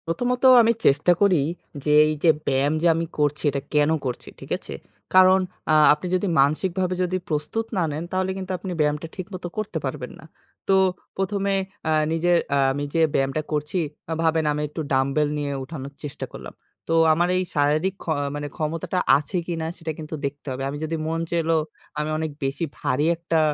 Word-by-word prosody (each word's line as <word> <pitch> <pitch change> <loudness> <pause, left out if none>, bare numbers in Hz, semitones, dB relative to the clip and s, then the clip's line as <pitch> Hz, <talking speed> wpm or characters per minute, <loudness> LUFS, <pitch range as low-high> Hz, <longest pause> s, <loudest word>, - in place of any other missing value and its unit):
প্রথমত 245 +9 -1 0.2
আমি 230 0 +4
চেষ্টা 140 +6 +4
করি 190 -7 +4 0.4
যে 150 - +1 0.2
এই 155 - 0
যে 170 - +6 0.2
ব্যায়াম 135 +3 +2
যে 175 - +3
আমি 165 +1 -1
করছি 145 -1 0
এটা 140 0 -2
কেন 150 0 +4 0.2
করছি, 125 -2 -4
ঠিক - - -11
আছে? - - -9 0.4
কারণ 185 0 +7 0.3
আ - - +4 0.2
আপনি 150 +4 -5
যদি 185 +2 0
মানসিকভাবে 180 +6 +1 0.3
প্রস্তুত 155 +9 -1
না 180 - +2
নেন 155 +3 -4
তাহলে 185 0 0
কিন্তু 190 0 -5
আপনি 185 +1 -6
ব্যায়ামটা 150 +1 0
ঠিকমত 185 -1 -7
করতে 215 -1 -3
পারবেন - - -4
না। - - -13 0.4
তো 195 - +4 0.4
প্রথমে 195 +1 0 0.4
আ - - +2 0.2
নিজের 175 +2 +3 0.2
আ - - +3 0.2
আমি 145 +1 -3
যে 165 - +3
ব্যায়ামটা 135 +3 +1
করছি 150 +4 -1 0.4
ভাবেন 160 -1 +2
আমি 150 - -2
একটু 160 - -5
ডাম্বেল 135 +3 +2
নিয়ে 145 -1 -2
উঠানো। 135 -1 -7 0.2
চেষ্টা 145 -2 -5
করলাম। - - -9 0.4
তো - - +2 0.2
আমার 175 +3 +1
এই 185 - +1
শারীরিক 155 +6 +2
ক্ষ - - -19 0.5
ক্ষমতাটা 165 +3 -2 0.2
আছে 150 +6 -4
কিনা 165 -2 -2
সেটা 165 -1 -4
কিন্তু 155 +1 -6
দেখতে 140 +1 -5
হবে। 130 +1 -4
আমি 145 - -5
যদি 165 +1 -2
মন 165 +1 -1
চাইলো 165 -1 +1 0.4
আমি 150 +1 -1
অনেক 160 -1 -2
বেশি 135 +5 -1
ভারী 130 +4 0
একটা 165 -1 0
160 Hz, 180 wpm, -24 LUFS, 145-185 Hz, 0.5 s, কারণ